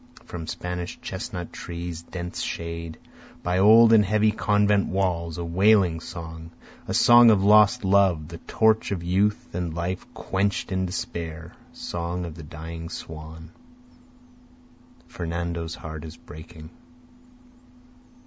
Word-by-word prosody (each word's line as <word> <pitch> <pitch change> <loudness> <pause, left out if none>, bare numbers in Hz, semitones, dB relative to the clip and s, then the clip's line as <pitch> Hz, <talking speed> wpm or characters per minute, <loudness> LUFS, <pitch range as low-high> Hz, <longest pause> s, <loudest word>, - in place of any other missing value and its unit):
From 85 -2 -7
Spanish 90 0 -5
chestnut 90 -2 -6
trees' 85 -1 -6
dense 90 +1 -6
shade, 85 -1 -5 0.5
By 90 +1 0
old 110 +3 +7
and 110 -2 +7
heavy 105 +2 +2
convent 105 -1 +2
walls 85 -4 -1
a 85 - -4
wailing 95 -1 +3
song, 80 -1 -8 0.4
Song 120 0 +7
of 100 -3 +4
lost 105 0 +5
love, 95 -5 +3
the 85 -1 -9
torch 110 +3 +1
of 90 -4 -3
youth 100 +4 0
and 85 -2 -3
life 90 +2 -3
quench'd 100 +1 -1
in 95 0 0
despair, 85 -2 -6 0.2
Song 85 +1 -4
of 85 - -7
the 80 - -10
dying 80 +2 -8
swan, 80 0 -9 1.6
Fernando's 85 -1 -4
heart 80 -1 -8
is 80 0 -9
breaking. 80 +1 -12
85 Hz, 120 wpm, -25 LUFS, 80-100 Hz, 1.6 s, old